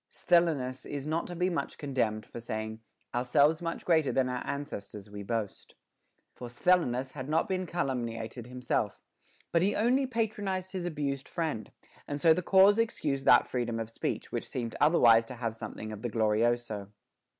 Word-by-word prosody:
Sthenelus 155 Hz, -7 st, +1 dB
is 145 Hz, -1 st, -5 dB
not 160 Hz, +2 st, -1 dB
to 175 Hz, -, -6 dB
be 180 Hz, +2 st, +1 dB
much 180 Hz, -, -2 dB
condemned 120 Hz, -7 st, -1 dB
for -, -, -9 dB
saying, 110 Hz, -1 st, -4 dB, 0.3 s
Ourselves 140 Hz, +6 st, +3 dB
much 170 Hz, -1 st, -4 dB
greater 160 Hz, -5 st, +3 dB
than 130 Hz, -1 st, +1 dB
our 125 Hz, -1 st, -2 dB
ancestors 105 Hz, -7 st, -6 dB
We 100 Hz, 0 st, -7 dB
boast;* 105 Hz, 0 st, -4 dB, 0.6 s
for 125 Hz, -, -8 dB
Sthenelus 130 Hz, -1 st, +1 dB
had 130 Hz, -1 st, -7 dB
not 160 Hz, +2 st, +2 dB
been 185 Hz, -1 st, -2 dB
calumniated 120 Hz, -7 st, -3 dB
himself, 125 Hz, -4 st, -2 dB, 0.5 s
but 170 Hz, -, +3 dB
he 195 Hz, +3 st, +2 dB
only 255 Hz, +5 st, +2 dB
patronized 205 Hz, -6 st, -2 dB
his 180 Hz, -2 st, -3 dB
abused 140 Hz, -4 st, -3 dB
friend; 155 Hz, -10 st, -3 dB, 0.4 s
and 145 Hz, 0 st, -3 dB
so 160 Hz, +2 st, +6 dB
the 180 Hz, -, -1 dB
cause 195 Hz, +4 st, +6 dB
ex 230 Hz, 0 st, 0 dB
cused 135 Hz, -3 st, -1 dB
that -, -, +7 dB
freedom 120 Hz, -2 st, -2 dB
of 115 Hz, 0 st, -5 dB
speech, -, -, -3 dB
which -, -, -4 dB
seemed 115 Hz, -3 st, -4 dB
otherwise 120 Hz, -8 st, +6 dB
to 125 Hz, -, -7 dB
have 115 Hz, -2 st, -3 dB
something 110 Hz, -1 st, -7 dB
of 105 Hz, -1 st, -7 dB
the 120 Hz, -, -2 dB
glorioso. 110 Hz, -1 st, +1 dB
135 Hz, 170 wpm, -30 LUFS, 115-170 Hz, 0.6 s, that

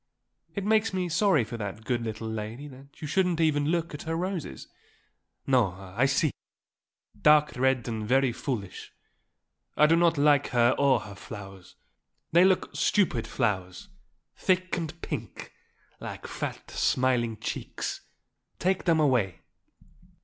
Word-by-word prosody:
It 200 Hz, -2 st, -3 dB
makes 220 Hz, 0 st, +2 dB
me 180 Hz, -1 st, -1 dB
sorry 170 Hz, -, +3 dB
for 115 Hz, +2 st, -6 dB
that 105 Hz, +1 st, -6 dB
good 120 Hz, 0 st, 0 dB
little 110 Hz, 0 st, -5 dB
lady 110 Hz, +5 st, -5 dB
that 135 Hz, +2 st, -16 dB
you -, -, -3 dB
shouldn't 180 Hz, +1 st, +1 dB
even 150 Hz, -3 st, +2 dB
look 170 Hz, 0 st, -1 dB
at 150 Hz, -, -6 dB
her 165 Hz, 0 st, -3 dB
roses." 175 Hz, -, -4 dB, 0.8 s
"No. 125 Hz, -9 st, +3 dB
I 95 Hz, +7 st, -1 dB
see 135 Hz, +4 st, +2 dB
her. -, -, -24 dB
Dark 150 Hz, 0 st, +5 dB
red 130 Hz, -1 st, +1 dB
and 110 Hz, -2 st, -3 dB
very 135 Hz, +1 st, +3 dB
foolish. 115 Hz, -5 st, -5 dB, 0.8 s
I 150 Hz, -, +7 dB
do 160 Hz, +2 st, +5 dB
not 170 Hz, -1 st, +3 dB
like 145 Hz, -1 st, +4 dB
her 120 Hz, 0 st, +3 dB
or 140 Hz, -2 st, +4 dB
her 100 Hz, -, -9 dB
flowers. 95 Hz, -2 st, -10 dB, 0.6 s
They 170 Hz, +2 st, +6 dB
look 190 Hz, -1 st, +2 dB
stupid 175 Hz, -, +1 dB
flowers 95 Hz, -7 st, -2 dB, 0.5 s
thick 185 Hz, -1 st, +1 dB
and 165 Hz, -1 st, -5 dB
pink, -, -, -6 dB, 0.5 s
like -, -, -7 dB
fat, -, -, -6 dB
smiling 120 Hz, -3 st, +1 dB
cheeks. -, -, -4 dB, 0.6 s
Take 185 Hz, +1 st, 0 dB
them 165 Hz, -2 st, +3 dB
away." 120 Hz, -, +1 dB
135 Hz, 140 wpm, -27 LUFS, 115-165 Hz, 0.8 s, I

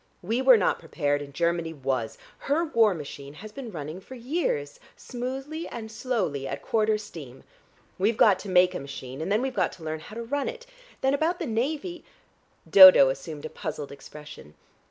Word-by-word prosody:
We 225 Hz, +7 st, 0 dB
were 260 Hz, -2 st, +7 dB
not 200 Hz, -, +1 dB
prepared, 145 Hz, -2 st, -1 dB
and 140 Hz, -1 st, -8 dB
Germany 170 Hz, +1 st, -1 dB
was. 130 Hz, -5 st, -3 dB, 0.2 s
Her 305 Hz, +5 st, 0 dB
war 225 Hz, -, +3 dB
machine 145 Hz, -2 st, -9 dB
has 215 Hz, +6 st, -10 dB
been 245 Hz, 0 st, -8 dB
running 155 Hz, +1 st, -7 dB
for 260 Hz, -, -11 dB
years, 240 Hz, -, -2 dB, 0.2 s
smoothly 270 Hz, +6 st, -5 dB
and 220 Hz, -2 st, -7 dB
slowly, 205 Hz, -, -2 dB
at -, -, -5 dB
quarter 215 Hz, -1 st, +1 dB
steam. 155 Hz, -12 st, -10 dB, 0.6 s
We've 215 Hz, +4 st, +1 dB
got 200 Hz, -4 st, +5 dB
to 200 Hz, -, -8 dB
make 180 Hz, 0 st, +4 dB
a -, -, -4 dB
machine, 135 Hz, 0 st, -8 dB
and 175 Hz, -, -3 dB
then 215 Hz, +4 st, +2 dB
we've 265 Hz, -1 st, -2 dB
got -, -, 0 dB
to 170 Hz, -, -13 dB
learn 155 Hz, 0 st, -4 dB
how 210 Hz, -, -12 dB
to 235 Hz, -, -5 dB
run 280 Hz, -, -2 dB
it. 485 Hz, 0 st, -9 dB, 0.4 s
Then 265 Hz, +1 st, +2 dB
about 320 Hz, +5 st, +1 dB
the -, -, -4 dB
navy 295 Hz, +10 st, -2 dB, 0.3 s
" -, -, -33 dB
Dodo 185 Hz, -8 st, +10 dB
assumed 145 Hz, +2 st, -6 dB
a -, -, -5 dB
puzzled 150 Hz, -2 st, -6 dB
expression. 150 Hz, -, -12 dB
195 Hz, 190 wpm, -26 LUFS, -, 0.6 s, Dodo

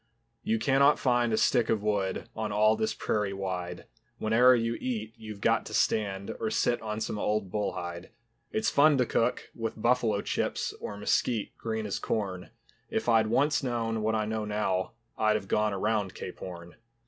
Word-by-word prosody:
You 110 Hz, -, 0 dB
cannot 135 Hz, +5 st, +4 dB
find 120 Hz, -2 st, +2 dB
a 110 Hz, -, +2 dB
stick 120 Hz, -1 st, +3 dB
of 110 Hz, -2 st, +1 dB
wood 100 Hz, -3 st, -1 dB
On 110 Hz, -1 st, -3 dB
all 110 Hz, +1 st, +4 dB
this 220 Hz, 0 st, 0 dB
prairie 105 Hz, -2 st, -1 dB
wide; 90 Hz, -2 st, -4 dB, 0.3 s
Whene'er 120 Hz, +4 st, +5 dB
you 115 Hz, -1 st, 0 dB
eat 110 Hz, -3 st, -3 dB
you've 110 Hz, -2 st, -9 dB
got -, -, +2 dB
to -, -, -5 dB
stand 100 Hz, -2 st, 0 dB
Or 110 Hz, -, -1 dB
sit 120 Hz, +2 st, +1 dB
on 110 Hz, 0 st, -4 dB
some 110 Hz, -1 st, -3 dB
old 105 Hz, -3 st, -1 dB
bull 105 Hz, -1 st, -1 dB
hide. 85 Hz, 0 st, -6 dB, 0.4 s
It's 220 Hz, 0 st, 0 dB
fun 145 Hz, 0 st, +5 dB
to 125 Hz, -, +3 dB
cook 120 Hz, +1 st, 0 dB
with 115 Hz, -1 st, -4 dB
buffalo 115 Hz, -3 st, +2 dB
chips -, -, -2 dB
Or 100 Hz, -, -5 dB
mesquite, 105 Hz, +2 st, 0 dB
green 110 Hz, -1 st, -3 dB
as 100 Hz, -, -2 dB
corn, 95 Hz, -4 st, -3 dB, 0.4 s
If -, -, -2 dB
I'd 115 Hz, -2 st, +4 dB
once 145 Hz, +7 st, +2 dB
known 115 Hz, -4 st, -1 dB
what 110 Hz, +1 st, +1 dB
I 110 Hz, -1 st, 0 dB
know 110 Hz, 0 st, -2 dB
now 105 Hz, -1 st, -1 dB, 0.3 s
I'd 110 Hz, 0 st, +3 dB
have 105 Hz, -2 st, -3 dB
gone 105 Hz, +1 st, +1 dB
around 105 Hz, 0 st, -1 dB
Cape -, -, -7 dB
Horn. 85 Hz, 0 st, -9 dB
110 Hz, 185 wpm, -29 LUFS, 100-115 Hz, 0.4 s, Whene'er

